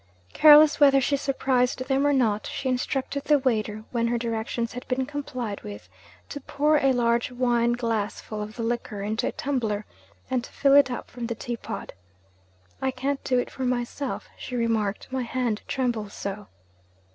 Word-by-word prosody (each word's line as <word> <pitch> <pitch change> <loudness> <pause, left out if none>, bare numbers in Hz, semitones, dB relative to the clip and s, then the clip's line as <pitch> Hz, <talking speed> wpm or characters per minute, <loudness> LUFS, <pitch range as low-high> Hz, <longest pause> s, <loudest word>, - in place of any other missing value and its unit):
Careless 305 0 +8
whether 275 -2 +6
she 275 +2 +1
surprised 260 -2 0
them 275 +1 +2
or - - +4
not, 225 -6 +1
she 270 - -4
instructed 265 +2 -2
the 295 - +5
waiter, 215 -5 -1
when 235 -1 +1
her 240 0 0
directions 230 0 -2
had 250 +1 -8
been 260 0 0
complied 255 -7 -5
with, 100 -3 -9 0.4
to 285 - -6
pour 300 +3 +2
a 270 -2 +3
large 235 -1 +1
wine 240 -1 +2
glass 230 -4 -2
full 215 -1 -6
of 210 +2 -6
the 230 - -4
liqueur 230 -3 -3
into 215 +2 -1
a - - -1
tumbler, 225 -7 -2 0.4
and 255 -2 -1
to - - -11
fill 275 -1 +3
it 280 -2 +7
up 245 - -6
from 240 -2 -5
the 230 - -3
teapot. 235 +1 -6 0.9
'I 265 - +1
can't 270 +2 -2
do 255 - +1
it 245 - -1
for - - -9
myself,' 250 +2 -2
she 250 - -7
remarked, 225 -4 0
'my 260 0 -1
hand 240 -3 -1
trembles 235 -6 -2
so.' 200 +1 -5
245 Hz, 180 wpm, -26 LUFS, 225-265 Hz, 0.9 s, Careless